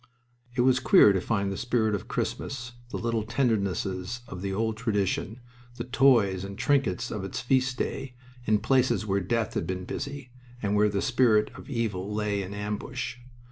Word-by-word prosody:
It 125 - +2
was 130 +1 +4
queer 130 - +6
to 95 - 0
find 100 -1 0
the 95 - -4
spirit 120 -3 +1
of 100 - -3
Christmas, 125 -2 -3 0.2
the - - -4
little 115 -1 -1
tendernesses 105 -3 -1
of 90 - -7
the 100 0 -2
old 110 +3 0
tradition, 110 -1 -1 0.4
the - - -4
toys 120 -8 +3
and 100 0 -7
trinkets 135 -11 +1
of 105 - -4
its 95 - -4
feast 130 0 +1
day, 125 0 -3 0.3
in 110 -1 +4
places 130 -1 +2
where 100 -1 +1
Death 110 +3 -1
had - - -2
been 90 0 -3
busy 140 0 -5 0.3
and 105 -2 0
where 105 0 +4
the 100 -1 -1
spirit 120 -5 +3
of - - -12
evil 105 -6 -2
lay 105 -1 -1
in 95 0 -6
ambush! 105 +5 -4
110 Hz, 180 wpm, -27 LUFS, 100-125 Hz, 0.4 s, queer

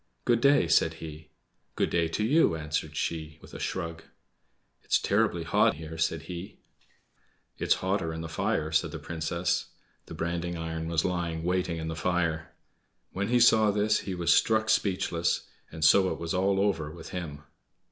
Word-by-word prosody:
"Good 120 -1 +3
day!" 140 -10 +5
said 80 0 +3
he. 80 -1 -9 0.5
"Good - - 0
day 85 -1 +2
to 85 +6 -2
you!" 140 - +4
answered 75 -1 -3
she, 80 -2 -3
with - - -15
a - - -7
shrug. 85 -3 -4 0.8
"It's - - +2
terribly - - +1
hot - - +3
here," 80 +1 -8
said 80 0 0
he. 90 +4 -8 1.0
"It's - - +3
hotter 95 -4 0
in 80 0 -5
the 80 - -5
fire," 80 0 -1
said 80 +1 +2
the 80 - -6
Princess. 85 +3 -2 0.4
The - - -8
branding 85 +1 -3
iron 80 0 -4
was 80 -1 0
lying 85 -3 -2
waiting 90 -1 0
in 80 0 -4
the 80 - -3
fire. 85 -2 -1 0.6
When 100 +2 -2
he 120 +2 +3
saw 110 -2 +6
this 105 +1 +2
he 95 -2 -5
was 85 -1 +3
struck 110 -1 +3
speechless, 90 -5 0 0.3
and 80 0 -1
so 95 +3 +5
it - - -3
was 85 +1 -4
all 95 +1 +2
over 95 -7 0
with 80 +1 -10
him. 75 -5 -6
85 Hz, 175 wpm, -28 LUFS, 80-95 Hz, 1.0 s, saw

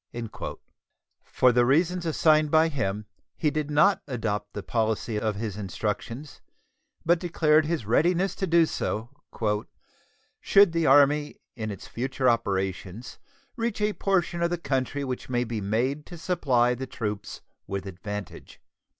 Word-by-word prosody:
For 125 - +3
the 120 0 +4
reasons 170 +7 +2
assigned 155 -1 +3
by 160 +2 +4
him, 105 -8 -2 0.3
he 150 - +1
did 150 0 -2
not 150 +7 +4
adopt 105 -5 -3
the 105 - -5
policy 110 -1 -1
of 110 -1 -1
his 105 -1 -4
instructions, 105 - -4 0.6
but 170 +1 +4
declared 155 -3 +2
his 160 -9 -2
readiness 175 - +2
to 190 - -1
do 170 0 +5
so 115 -6 -3 1.3
"should 200 -3 +5
the 165 -2 +1
Army 145 +2 +4 0.2
in 110 -3 -4
its 100 -3 -7
future 130 +2 -2
operations 100 -1 -1 0.4
reach 230 -3 -2
a 210 0 +1
portion 180 -4 0
of 170 - +2
the 175 - -1
country 140 -2 -2
which 130 -2 -5
may 120 -1 +1
be 115 -2 -4
made 125 +9 -1
to 175 - -9
supply 135 -8 +2
the 130 +2 -5
troops 105 -4 -5 0.3
with 100 0 -4
advantage." 100 +1 -7
130 Hz, 140 wpm, -26 LUFS, 110-165 Hz, 1.3 s, do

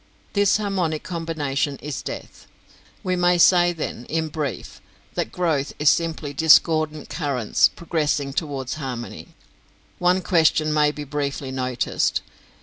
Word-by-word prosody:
This 205 -1 +3
harmonic 185 -7 -1
combination 155 -5 -2
is 145 -1 -6
death. - - -8 0.6
We 185 -1 0
may 175 0 +3
say 175 0 +5
then, 155 -7 -5
in 160 0 -2
brief, 150 -4 -5 0.3
that - - -2
growth 160 -6 -1
is 150 0 +4
simply 160 -4 -2
discordant 155 0 +4
currents 140 -9 +1
progressing 150 -4 -2
towards 140 -4 -3
harmony. 125 -3 -6 0.6
One 180 +1 +2
question 160 -3 +3
may 150 -1 +3
be 150 0 -7
briefly 140 -1 -3
noticed. 130 -2 -1
155 Hz, 125 wpm, -23 LUFS, 140-170 Hz, 0.6 s, say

